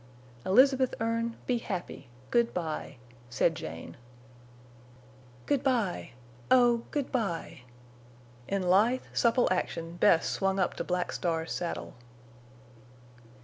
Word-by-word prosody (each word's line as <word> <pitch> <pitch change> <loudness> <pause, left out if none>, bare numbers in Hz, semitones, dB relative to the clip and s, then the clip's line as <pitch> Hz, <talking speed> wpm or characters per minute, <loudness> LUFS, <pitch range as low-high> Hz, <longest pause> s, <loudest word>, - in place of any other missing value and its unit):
"Elizabeth 260 +5 +4
Erne, 230 +1 -1
be 245 -2 +1
happy! 185 - -6 0.2
Good 235 -1 +2
by," 160 -4 -4 0.3
said 125 +7 +2
Jane. 80 - -8 1.5
"Good 285 -3 +1
by—oh—good 235 - 0
by!" 195 - -2 0.9
In 195 -1 -1
lithe, 210 +8 +3
supple 240 +1 +3
action 170 -2 -2
Bess 165 -1 +4
swung 195 0 0
up 185 -2 +1
to - - -2
Black 180 0 -1
Star's 165 -2 -2
saddle. 175 - -4
195 Hz, 100 wpm, -29 LUFS, 165-240 Hz, 1.5 s, Elizabeth